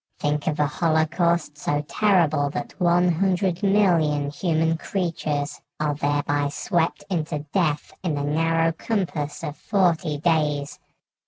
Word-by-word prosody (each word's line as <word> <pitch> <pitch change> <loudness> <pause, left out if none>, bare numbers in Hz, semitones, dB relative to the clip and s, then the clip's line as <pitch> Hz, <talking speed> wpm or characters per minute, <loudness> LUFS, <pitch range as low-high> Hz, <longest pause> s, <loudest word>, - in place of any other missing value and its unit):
Think 150 0 -1
of 155 -1 0
a 150 - +4
holocaust 160 0 +1
so 145 0 0
terrible 165 -10 +2
that - - -5
one 175 0 +3
hundred 180 +1 +1
million 170 -8 +2
human 165 0 +1
creatures 155 -5 -3 0.2
are 150 -1 0
thereby 145 0 0
swept 170 +3 -1
into 155 -3 -2
death 155 -6 0
in 170 -5 -1
the 145 - -2
narrow 165 +2 +1
compass 165 -6 -3
of 145 - -4
forty 170 -8 +1
days! 150 -3 0
160 Hz, 130 wpm, -24 LUFS, 145-175 Hz, 0.2 s, a